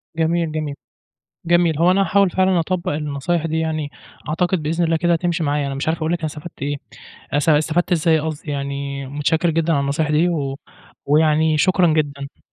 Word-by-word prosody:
جميل، 165 0 0
جميل، 155 -2 -3 0.7
جميل. 170 -2 +3
هو 170 +2 +4
أنا 195 +2 +3
هاحاول 200 -1 +3
فعلًا 185 -1 +2
أطبّق 175 0 -2
النصايِح 150 +3 -2
دي 160 0 -1
يعني، 155 -2 -2 0.4
أعتقد 175 +2 0
بإذن 165 +3 0
الله 165 0 +2
كده 175 +1 +2
تمشِي 175 0 -1
معايا. 145 -1 0
أنا 135 - -3
مش 140 +3 -3
عارف 160 +1 0
أقول 160 +1 -1
لكِ 175 - 0
أنا 165 - -3
استفدت 155 0 -9
إيه، 145 +1 -1 0.6
أست 145 +2 +2
استفدت 160 +4 +2
إزاي 160 -2 +3
قصدي، 150 -1 -5
يعني 140 0 -4
متشكر 150 +5 0
جدًا 165 0 +1
على 140 - +2
النصايِح 145 +2 -1
دي، 160 +4 +3
و 140 -5 -2 0.5
ويعني 155 +1 +3
شكرًا 180 +2 +3
جدًا. 140 -3 -3
160 Hz, 185 wpm, -20 LUFS, 145-170 Hz, 0.7 s, هو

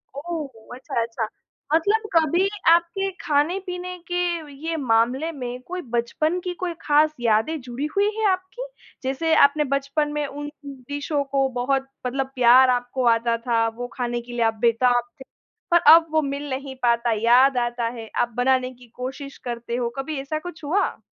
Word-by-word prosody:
ओह! 320 0 -4 0.3
अच्छा-अच्छा। 230 -3 -3 0.5
मतलब 420 +7 +2
कभी 335 +4 +3 0.2
आपके 340 +3 +3
खाने-पीने 360 +4 -1
के 355 - 0 0.5
ये 330 - -1
मामले 255 +5 +1
में 250 -4 -6
कोई 365 +1 -4
बचपन 310 +9 0
की 360 -1 -3
कोई 355 -2 -1
खास 305 +1 +3
यादें 230 +8 +1
जुड़ी 250 +3 -5
हुई 405 +1 +3
है 440 - 0
आपकी? 375 +7 -4 0.4
जैसे 275 +5 0
आपने 295 +2 +4
बचपन 280 +2 0
में 295 0 -1
उन 290 +1 -6 0.2
डिशों 285 +2 -3
को 275 -1 +2
बहुत 270 +1 0 0.2
मतलब 265 +1 -2
प्यार 255 +1 +6
आपको 245 +1 0
आता 230 0 +2
था 230 -1 +2
वो 245 0 -4
खाने 240 -2 -2
के 240 +1 -12
लिए 240 - -2
आप 225 - +2
बेताब 245 +1 +3 0.2
थे, 265 - -9 0.5
पर 345 - +6
अब 330 0 +6
वो 315 0 +3
मिल 280 0 -4
नहीं 265 0 -5
पाता, 235 0 +2
याद 245 +4 +4
आता 240 -1 -1
है, 225 -1 -8
आप 240 - +1
बनाने 255 0 +2
की 245 0 -18
कोशिश 265 +2 -6
करते 235 -1 -5
हो। 240 -1 -1
कभी 270 +2 -3
ऐसा 310 +3 -3
कुछ 335 -1 -9
हुआ? 355 +8 0
270 Hz, 170 wpm, -23 LUFS, 245-315 Hz, 0.5 s, प्यार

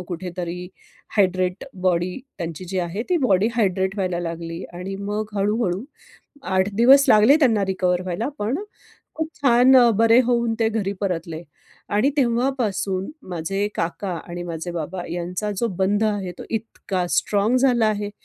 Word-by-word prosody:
कुठेतरी 180 0 -5 0.5
hydrate 185 -2 +1 0.2
body 180 +1 +1 0.2
त्यांची 170 0 -5
जी 190 -1 -2
आहे 175 +5 -3
ती 360 - +4
बॉडी 195 +3 +3
हायड्रेट 190 -3 +1
व्हायला 185 -3 -1
लागली 165 0 -5
आणि 185 +2 -5
मग 210 0 -3
हळू-हळू 200 0 0 0.6
8 190 +1 +1
दिवस 265 +6 +7
लागले 215 +7 +7
त्यांना 225 -7 +3
रिकव्हर 185 -1 0
व्हायला, 185 +8 -3
पण 220 +8 -1 0.6
खूप 320 0 -2
छान 255 0 +6
अ, 240 -2 +7
बरे 230 +3 +5
होऊन 235 -2 +1
ते 225 - +3
घरी 210 -3 -1
परतले. 165 -4 -3 0.5
आणि 215 +7 +2
तेव्हापासून 235 -7 0 0.2
माझे 180 +4 -2
काका 175 +4 -3 0.2
आणि 175 0 -5
माझे 170 0 -5
बाबा 175 +2 -4
यांचा 180 +4 -3
जो 235 - 0
बंध 205 +3 +2
आहे 200 -4 -1
तो - - -7
इतका 205 -4 -3
स्ट्राँग 210 +4 +2
झाला 245 -3 +3
आहे. 205 -1 -1
195 Hz, 150 wpm, -22 LUFS, 180-225 Hz, 0.6 s, दिवस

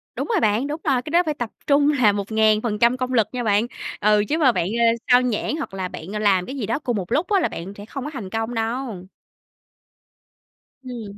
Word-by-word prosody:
Đúng - - -3
rồi 440 -6 +1
bạn, 220 +4 +1
đúng 305 +2 -5
rồi, 265 -5 +1
cái 300 - -8
đó 345 +1 +5
phải 305 - 0
tập 240 -6 -4 0.2
trung 285 +1 +4
là 245 -8 +4
1000% 220 +3 +2
công 255 0 -3
lực 220 -3 +3
nha 250 -1 -3
bạn, 215 +2 +2 0.3
ừ, 210 0 +3
chứ 310 - +1
mà 275 -6 +4
bạn, 170 - -1
ơ, 230 +3 +1 0.3
xao 245 0 +7
nhãng 250 +4 -1
hoặc 245 - -5
là 190 -1 -3
bạn 175 0 -9
làm 200 -4 +2
cái 270 - -7
gì 240 -7 -3
đó 230 +7 -1
cùng 245 -7 -2
một 185 +2 -5
lúc 330 +7 +1
á 400 -2 +3
là 335 - +1
bạn 185 +4 -7
sẽ 205 - -9
không 270 +3 -6
có - - -3
thành 210 -8 -6
công 225 +3 -3
đâu. 225 -4 -3 1.8
Ừm. 225 -5 -8
230 Hz, 230 wpm, -22 LUFS, 210-270 Hz, 1.8 s, xao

